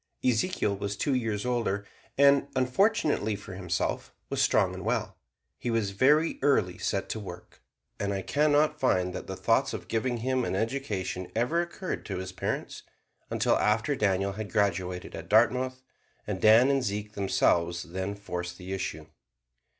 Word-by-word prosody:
Ezekiel 120 Hz, -, +1 dB
was 100 Hz, +1 st, -4 dB
two 145 Hz, -, 0 dB
years 115 Hz, -4 st, -1 dB
older 115 Hz, -5 st, -1 dB, 0.3 s
and, 140 Hz, 0 st, +5 dB
unfortunately 130 Hz, -, +2 dB
for 100 Hz, -2 st, -9 dB
himself, 90 Hz, -2 st, -2 dB, 0.2 s
was -, -, +1 dB
strong -, -, +3 dB
and -, -, -7 dB
well. -, -, -1 dB, 0.4 s
He 120 Hz, -, -3 dB
was 115 Hz, -4 st, 0 dB
very 150 Hz, +10 st, +3 dB
early 120 Hz, -11 st, +2 dB
set 100 Hz, -, -1 dB
to 110 Hz, -, -3 dB
work, 90 Hz, -4 st, -10 dB, 0.4 s
and 100 Hz, 0 st, -1 dB
I 95 Hz, -1 st, -2 dB
can 150 Hz, +7 st, +2 dB
not 150 Hz, +1 st, +3 dB
find 90 Hz, -9 st, +1 dB
that -, -, -6 dB
the -, -, -4 dB
thought -, -, +1 dB
of -, -, -8 dB
giving 120 Hz, +2 st, -1 dB
him 130 Hz, +2 st, 0 dB
an 95 Hz, -, -1 dB
education 100 Hz, -6 st, -3 dB
ever 125 Hz, +10 st, +2 dB
occurred 175 Hz, +2 st, -5 dB
to 95 Hz, -, -3 dB
his 95 Hz, 0 st, -5 dB
parents, 95 Hz, -, -4 dB, 0.5 s
until -, -, +2 dB
after 110 Hz, +7 st, +2 dB
Daniel 100 Hz, -4 st, +1 dB
had 100 Hz, -1 st, -6 dB
graduated 90 Hz, -3 st, -1 dB
at -, -, -8 dB
Dartmouth, 130 Hz, +4 st, +3 dB, 0.4 s
and 100 Hz, -3 st, -4 dB
Dan 115 Hz, +5 st, +7 dB
and 135 Hz, -1 st, +2 dB
Zeke 105 Hz, -2 st, -3 dB
themselves 85 Hz, -3 st, +1 dB
then 95 Hz, +3 st, -4 dB
forced 90 Hz, -3 st, -5 dB
the 95 Hz, +1 st, -6 dB
issue. 90 Hz, -5 st, -4 dB
105 Hz, 165 wpm, -28 LUFS, 95-130 Hz, 0.5 s, Dan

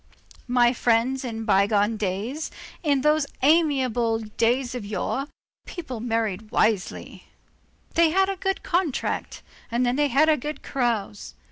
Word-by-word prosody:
My 245 Hz, -1 st, +4 dB
friends, 245 Hz, +2 st, +1 dB
in 225 Hz, -3 st, -5 dB
bygone 205 Hz, +1 st, +3 dB
days, 215 Hz, +9 st, -3 dB, 0.3 s
in 285 Hz, -5 st, +1 dB
those 300 Hz, 0 st, +2 dB, 0.2 s
amiable 265 Hz, -7 st, +3 dB
days 235 Hz, +4 st, 0 dB
of 250 Hz, -3 st, -5 dB
yore, 215 Hz, +7 st, -3 dB, 0.4 s
people 285 Hz, -10 st, -6 dB
married 220 Hz, -3 st, -2 dB
wisely; 215 Hz, -4 st, -1 dB, 0.7 s
they 335 Hz, -1 st, +4 dB
had 380 Hz, +4 st, +3 dB
a 390 Hz, -, -2 dB
good 385 Hz, +1 st, -2 dB
contract, 340 Hz, -6 st, -2 dB, 0.3 s
and 240 Hz, +2 st, +1 dB
then 245 Hz, +2 st, +1 dB
they 295 Hz, 0 st, +3 dB
had 285 Hz, +4 st, +3 dB
a 310 Hz, -1 st, +4 dB
good 300 Hz, +4 st, -6 dB
carouse. 220 Hz, -, -2 dB
245 Hz, 135 wpm, -24 LUFS, 225-295 Hz, 0.7 s, My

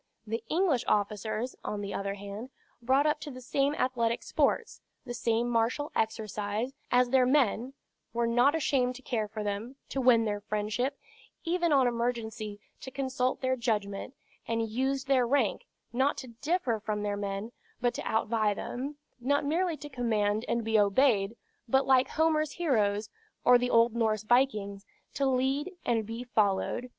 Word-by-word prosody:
The 225 Hz, +1 st, -3 dB
English 330 Hz, -7 st, +2 dB
officers, 215 Hz, +4 st, -1 dB
on 210 Hz, -1 st, -3 dB
the 200 Hz, 0 st, -4 dB
other 200 Hz, 0 st, -2 dB
hand, 205 Hz, +4 st, -7 dB, 0.3 s
brought 265 Hz, +4 st, +3 dB
up 300 Hz, -1 st, +2 dB
to 295 Hz, -, -7 dB
the 255 Hz, -2 st, -8 dB
same 275 Hz, +3 st, 0 dB
athletic 235 Hz, -3 st, 0 dB
sports, -, -, 0 dB, 0.2 s
the 245 Hz, -, -5 dB
same 230 Hz, 0 st, 0 dB
martial 240 Hz, +5 st, 0 dB
exercise, 215 Hz, +2 st, -2 dB, 0.2 s
as 250 Hz, 0 st, +4 dB
their 260 Hz, -1 st, +5 dB
men, 255 Hz, -2 st, +2 dB, 0.4 s
were 235 Hz, 0 st, 0 dB
not 245 Hz, +6 st, +4 dB
ashamed 255 Hz, -5 st, +1 dB
to 265 Hz, -, -11 dB
care 220 Hz, -4 st, -1 dB
for 215 Hz, 0 st, -5 dB
them, 205 Hz, +5 st, -3 dB
to 270 Hz, -, -2 dB
win 240 Hz, -3 st, +5 dB
their 205 Hz, -1 st, -2 dB
friendship, 215 Hz, +6 st, -2 dB, 0.5 s
even 345 Hz, -1 st, +1 dB
on 270 Hz, -3 st, +5 dB
emergency 230 Hz, -3 st, -2 dB, 0.2 s
to -, -, -7 dB
consult 260 Hz, -1 st, -1 dB
their 260 Hz, 0 st, +1 dB
judgment; 220 Hz, 0 st, -2 dB, 0.3 s
and 230 Hz, -1 st, -1 dB
used 265 Hz, +4 st, -1 dB
their 260 Hz, -3 st, +3 dB
rank, 255 Hz, -5 st, +1 dB, 0.3 s
not 265 Hz, +4 st, +2 dB
to 260 Hz, -, -7 dB
differ 255 Hz, -1 st, -1 dB
from 210 Hz, 0 st, -3 dB
their 205 Hz, -1 st, -1 dB
men, 200 Hz, +2 st, -4 dB, 0.3 s
but 245 Hz, -1 st, +1 dB
to -, -, -4 dB
outvie 220 Hz, -1 st, +1 dB
them; 275 Hz, +8 st, -5 dB, 0.2 s
not 285 Hz, +4 st, +1 dB
merely 335 Hz, +2 st, 0 dB
to 295 Hz, -, -8 dB
command 220 Hz, -4 st, 0 dB
and 235 Hz, 0 st, 0 dB
be 220 Hz, -1 st, +3 dB
obeyed, 205 Hz, 0 st, +3 dB, 0.3 s
but 265 Hz, +4 st, +3 dB
like 260 Hz, -1 st, +4 dB
Homer's 310 Hz, -2 st, +1 dB
heroes, 215 Hz, -10 st, 0 dB, 0.3 s
or 245 Hz, 0 st, +7 dB
the 245 Hz, 0 st, 0 dB
old 230 Hz, -1 st, +4 dB
Norse 220 Hz, -2 st, +1 dB
vikings, 215 Hz, -5 st, +1 dB, 0.3 s
to 275 Hz, -1 st, +1 dB
lead 265 Hz, +6 st, +1 dB
and 225 Hz, -3 st, +1 dB
be 230 Hz, +2 st, -5 dB
followed. 220 Hz, +1 st, 0 dB
240 Hz, 165 wpm, -29 LUFS, 215-265 Hz, 0.5 s, or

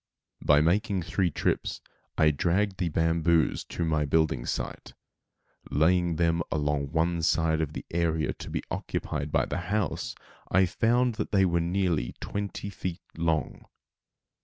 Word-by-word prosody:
By 75 Hz, 0 st, +5 dB
making 95 Hz, +3 st, +1 dB
three 90 Hz, +2 st, 0 dB
trips -, -, -1 dB, 0.4 s
I 75 Hz, -1 st, +5 dB
dragged 95 Hz, +6 st, 0 dB
the 90 Hz, -2 st, 0 dB
bamboos 80 Hz, 0 st, +2 dB
to 85 Hz, -, -3 dB
my 80 Hz, -2 st, +1 dB
building 75 Hz, -4 st, +1 dB
site. -, -, -4 dB, 0.7 s
Laying 85 Hz, +2 st, +3 dB
them 85 Hz, 0 st, +2 dB
along 75 Hz, -2 st, 0 dB
one 85 Hz, +3 st, 0 dB
side 80 Hz, 0 st, +2 dB
of 75 Hz, -1 st, -2 dB
the -, -, -6 dB
area 80 Hz, -2 st, 0 dB
to -, -, -9 dB
be -, -, -3 dB
occupied 70 Hz, +2 st, -3 dB
by -, -, +2 dB
the -, -, -3 dB
house, 105 Hz, +1 st, -1 dB, 0.3 s
I 95 Hz, +1 st, +4 dB
found 120 Hz, +6 st, +2 dB
that -, -, -4 dB
they 95 Hz, -2 st, +4 dB
were 85 Hz, -1 st, +2 dB
nearly 85 Hz, -7 st, 0 dB
twenty 100 Hz, 0 st, -4 dB
feet 95 Hz, -1 st, -5 dB
long. 80 Hz, -2 st, -1 dB
85 Hz, 145 wpm, -28 LUFS, 80-95 Hz, 0.7 s, By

